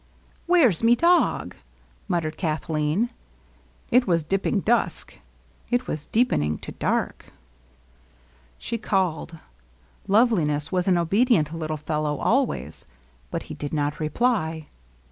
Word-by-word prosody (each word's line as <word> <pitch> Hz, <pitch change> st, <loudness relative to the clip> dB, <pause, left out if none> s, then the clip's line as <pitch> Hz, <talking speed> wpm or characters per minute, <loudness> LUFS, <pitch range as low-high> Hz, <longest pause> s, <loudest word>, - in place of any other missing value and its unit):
"Where's 310 Hz, -, +4 dB
me 230 Hz, +1 st, +5 dB
dog?" 345 Hz, +6 st, +2 dB, 0.5 s
muttered 165 Hz, -5 st, -1 dB
Kathleen. 160 Hz, +5 st, -1 dB, 0.8 s
It 250 Hz, 0 st, +4 dB
was 170 Hz, -3 st, +2 dB
dipping 195 Hz, +5 st, 0 dB
dusk; 230 Hz, -, 0 dB, 0.5 s
it 245 Hz, +1 st, +1 dB
was 150 Hz, -1 st, -5 dB
deepening 75 Hz, -, +1 dB
to -, -, -9 dB
dark. -, -, -2 dB, 1.3 s
She 230 Hz, -, -4 dB
14 -, -, -15 dB
LOVELINESS. -, -, -14 dB
called. 175 Hz, -4 st, 0 dB, 0.7 s
Loveliness 175 Hz, -, +2 dB
was 180 Hz, -1 st, 0 dB
an 185 Hz, -2 st, +4 dB
obedient 175 Hz, -, +2 dB
little 155 Hz, -1 st, -3 dB
fellow 150 Hz, -1 st, -2 dB
al 265 Hz, +2 st, +3 dB
ways; 75 Hz, -, -7 dB, 0.4 s
but -, -, -4 dB
he -, -, -8 dB
did 145 Hz, 0 st, -6 dB
not 145 Hz, 0 st, -1 dB
reply. 160 Hz, -2 st, 0 dB
170 Hz, 125 wpm, -24 LUFS, 155-230 Hz, 1.3 s, me